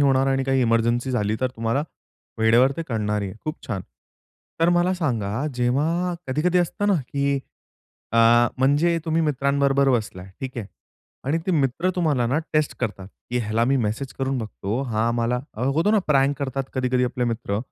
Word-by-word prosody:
होणार 135 -1 +3
आणि 135 0 +1
काही 135 -1 +2
एमर्जन्सी 120 +2 +1
झाली 105 -3 0
तर 130 0 0
तुम्हाला, 115 +5 0 0.6
वेळेवर 115 +4 +5
ते 165 - -2
कळणार 105 -3 -1
आहे. 95 -1 -4
खूप 155 0 -3
छान. 100 -6 -3 0.8
तर 165 - +4
मला 175 +1 +3
सांगा, 125 - -1
जेव्हा 155 +9 0
कधी-कधी 155 +7 +1
असतं 205 +4 0
ना, 200 - +4
की 140 0 0 0.7
अ, - - +1 0.4
म्हणजे 150 +6 +3
तुम्ही 165 0 +1
मित्रांबरोबर 140 -1 +2
बसलाय 105 -6 -2
ठीक 130 -1 -5
आहे. 105 - -5 0.6
आणि 145 +5 +1
ते - - +1
मित्र 150 +4 +1
तुम्हाला 150 -8 +1
ना, 135 +6 +1
टेस्ट 155 -1 +1
करतात, 100 -5 -3 0.2
की 125 - 0
ह्याला 115 0 0
मी 135 +3 +2
मेसेज 120 +3 -2
करून 135 0 -1
बघतो. 110 +1 -3
हां, 115 -3 -1
आम्हाला 120 +1 0 0.3
होतो 165 +6 +2
ना 215 - +4
प्रॅन्क 140 -1 +3
करतात 135 -1 -2
कधी-कधी 125 -1 +1
आपले 125 0 -1
मित्र 115 -3 -2
130 Hz, 170 wpm, -23 LUFS, 115-145 Hz, 0.8 s, वेळेवर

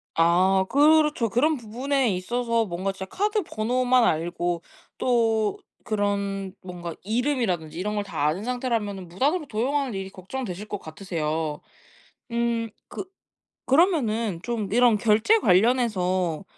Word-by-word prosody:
아 185 +3 +4
그렇죠. 300 -3 +4
그런 295 +7 +2
부분에 250 +3 -1
있어서 230 +4 0
뭔가 185 +2 -2
진짜 190 0 -7
카드 415 - 0
번호만 250 -1 +1
알고 175 0 0 0.4
또 225 -4 +2 0.3
그런 200 -2 -1
뭔가 175 -2 -7
이름이라든지 215 - -1
이런 210 +2 -2
걸 205 - -1
다 155 -7 -1
아는 180 +7 -1
상태라면은 225 -7 -2
무단으로 290 - 0
도용하는 260 +2 -1
일이 195 0 -4
걱정되실 200 0 -6
거 205 - -4
같으세요. 155 -3 -3 0.7
음 235 -1 0 0.2
그 - - -6 0.6
그러면은 235 - +2
좀 220 -5 -3
이런 240 -3 +5
결제 220 - +4
관련해서 185 - +2
215 Hz, 285 characters per minute, -25 LUFS, 185-250 Hz, 0.7 s, 이런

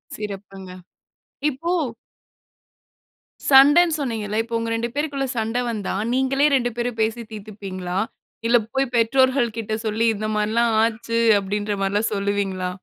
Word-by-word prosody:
சிறப்புங்க. 195 -2 -7 0.8
இப்போ 335 +6 -3 1.8
சண்டன்னு 290 +5 +7
சொன்னீங்கல்ல. 220 -5 -3
இப்ப 230 +1 -10
உங்க 230 - -3
2 235 +1 -2
பேருக்குள்ள 285 -2 -1
சண்ட 225 +2 -1
வந்தா 210 -5 -3 0.2
நீங்களே 265 +2 +2
2 245 -2 +1
பேரும் 240 -1 -2
பேசி 225 +2 0
தீர்த்துப்பீங்களா? 195 -4 -6 0.5
இல்ல 240 - +5 0.2
போய் 270 -2 0
பெற்றோர்கள் 245 0 +2
கிட்ட 220 -1 -3
சொல்லி, 220 +2 0
"இந்த 215 +1 -3
மாரி 210 0 0
எல்லாம் 235 0 +2
ஆச்சு." 230 0 -1 0.2
அப்டின்ற 205 +1 -2
மார்லாம் 205 +3 0
சொல்லுவீங்களா? 200 -2 -1
225 Hz, 125 wpm, -22 LUFS, 205-255 Hz, 1.8 s, சண்டன்னு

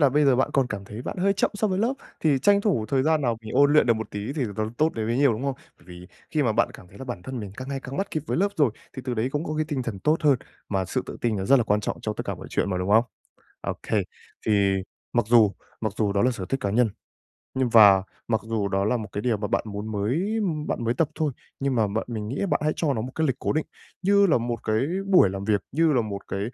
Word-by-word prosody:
là 145 - +6
bây 145 +3 +3
giờ 135 -3 +4
bạn 130 - +1
còn 135 -2 +3
cảm 105 -5 -5
thấy 105 +4 -8
bạn - - -5
hơi 195 +2 +3
chậm 195 - +1
so 210 +1 +1
với 190 -2 -1
lớp, 230 +5 +2 0.3
thì 150 -4 +3
tranh 200 +9 +4
thủ 165 - 0
thời 135 +1 +2
gian 155 +1 +2
nào 120 -3 +1
mình 110 - -8
ôn 145 +2 +5
luyện 150 - +5
được 115 - +4
một 110 -1 -5
tí 105 +5 -4
thì 145 -2 -2
nó 110 0 -1
tốt 155 +1 +3
đến 110 -1 -2
bấy 115 +1 0
nhiêu, 140 -2 +4
đúng 110 +3 -4
không? 140 -1 0 0.2
Bởi 85 - -23
vì 90 0 -11 0.2
khi 155 -2 +1
mà 120 -5 +2
bạn - - +2
cảm 90 - -12
thấy 100 +1 -15
là - - -7
bản 120 -9 -6
thân 130 +2 -5
mình 100 -3 -7
càng 130 +1 -7
ngày 135 -1 -3
càng 135 +1 -7
bắt 195 - -2
kịp 155 - -2
với - - -1
lớp 200 +3 +3
rồi, 145 - +4 0.3
thì 130 - -5
từ 125 -2 -2
đấy 115 +2 0
cũng 150 +2 -1
có 155 - -3
cái 155 - +1
tinh 140 -5 -1
thần 110 -5 -4
tốt 155 +10 +2
hơn, 145 -4 +4 0.3
mà 95 -2 0
sự - - -2
tự - - -7
tin 115 -3 0
nó 95 - -2
rất 135 +7 +6
là 120 - +2
quan 105 -1 +2
trọng - - -4
cho 110 - -2
tất - - -4
cả - - -2
mọi - - -10
chuyện 100 - 0
mà, 90 - -1
đúng 90 +2 -2
không? 110 +3 +6 0.6
Okay, - - -1 0.4
thì 100 -2 +3 0.4
mặc 120 -3 +2
dù 115 -4 +6 0.3
mặc 110 -2 -1
dù 105 -3 +1
đó 100 - +2
là 125 - +4
sở 110 -7 -5
thích 135 - -1
cá 100 - -1
nhân 115 +1 +3 0.6
nhưng 130 -2 0
và 100 -4 +7 0.2
mặc 110 -2 +1
dù 110 -2 -1
đó 95 0 0
là 120 +3 +2
một 110 - -5
cái 105 - -3
điều 115 -3 +1
mà 105 0 -3
bạn - - 0
muốn 105 +1 -5
mới 150 - 0 0.3
bạn 120 - -2
mới 115 - +1
tập 150 +4 +1
thôi, 155 -2 0 0.3
nhưng 135 -1 0
mà 110 -3 +3
bạn 110 +3 -2
mình 110 -3 -4
nghĩ 130 - -4
là 200 - 0
bạn - - +1
hãy 155 0 +2
cho 150 -4 +1
nó 110 - -2
một 125 +3 -5
cái 160 -1 +1
lịch 130 - +1
cố - - -1
định 155 +1 0 0.4
như 200 +2 +5
là 155 - +4
một 120 -1 -3
cái 110 0 +1 0.3
buổi 185 - +6
làm 95 +1 -5
việc, 100 -2 +1
như 160 +1 +3
là 125 - +3
một 100 -3 -6
cái 100 - -3
120 Hz, 305 wpm, -25 LUFS, 105-145 Hz, 0.6 s, và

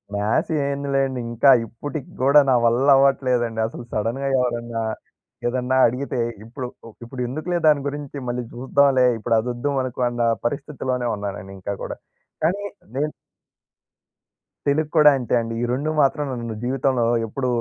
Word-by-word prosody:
Maths 105 +9 0 0.2
ఏందిలేండి. 135 -2 -1
ఇంకా 120 +4 +4 0.2
ఇప్పటికి 130 +5 -7
గూడా, 140 +3 +6
నా 130 - +5
వల్ల 120 +4 +3
అవ్వట్లేదండి 125 -4 +2
అసలు 115 - -8
సడెన్‌గా 115 +6 -1
ఎవరన్నా, 120 -2 -2 0.7
ఏదన్నా 125 +1 0
అడిగితే 130 +2 -3 0.3
ఇప్పుడు, 125 +2 -6 0.2
ఒ - - -9
ఇప్పుడు 125 +2 -7
ఎందుకులే 155 +7 -2
దాని 150 -2 +5
గురించి 145 0 -5
మళ్ళీ 120 0 -2
జూద్దాంలే. 130 +1 +3
ఇప్పుడు 115 +1 0
అదొద్దు 120 +4 -2
మనకు 130 -1 -4
అన్న 120 0 -3 0.2
పరిస్థితిలోనే 130 -2 -2
ఉన్నానండి 95 -2 -6
ఇంకా 100 +2 -4
గూడా. - - -4 0.5
కానీ 190 +6 +1 0.3
నేను 150 +2 0 1.6
తెలుగు 150 +2 +1
కూడా 150 -1 +8
అంతే 125 -3 -3
అండి. 115 0 -3
ఈ - - 0
2 145 +5 -1
మాత్రం 145 +1 +2
నన్ను 120 -2 -4
జీవితంలో 130 -1 +1 0.2
ఎప్పుడు 130 +4 -3
130 Hz, 140 wpm, -22 LUFS, 120-140 Hz, 1.6 s, కూడా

